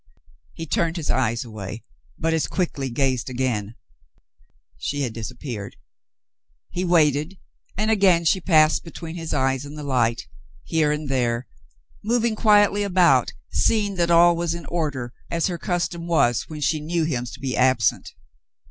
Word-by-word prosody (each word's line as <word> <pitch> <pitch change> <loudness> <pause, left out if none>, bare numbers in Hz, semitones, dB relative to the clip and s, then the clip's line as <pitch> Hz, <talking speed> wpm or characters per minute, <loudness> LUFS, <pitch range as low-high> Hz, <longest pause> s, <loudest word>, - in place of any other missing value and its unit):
He 165 - -6
turned 165 +2 0
his 160 - -1
eyes 120 -2 0
away, 110 -1 -7 0.3
but 165 0 0
as 160 - 0
quickly 145 -7 -2
gazed 130 0 0
again; 120 -4 -2 1.0
she 145 - -2
had 120 -4 -3
disappeared. 115 -2 -6 1.0
He 180 - -2
waited, 160 0 +2 0.4
and 215 +2 +1
again 190 -5 +4
she 185 +3 +3
passed 155 -3 +4
between 165 0 -8
his 165 -2 -5
eyes 135 -2 0
and 145 +1 -9
the 150 - -6
light, 120 -4 +1 0.4
here 155 - +1
and 150 0 -3
there, 125 -2 0 0.6
moving 230 +1 +1
quietly 205 -2 +4
about, 175 -10 +3 0.2
seeing 200 - +1
that 170 -1 +1
all 170 0 +6
was 170 0 -1
in 170 - -8
order, 145 -8 -3 0.2
as 170 -1 0
her 175 -3 -2
custom 170 -1 -2
was 120 -9 +2
when 155 -1 -7
she 155 +2 +1
knew 165 +2 -1
him 130 -6 -1
to - - -9
be 130 -2 -3
absent. 125 -5 +2
155 Hz, 155 wpm, -23 LUFS, 125-170 Hz, 1.0 s, all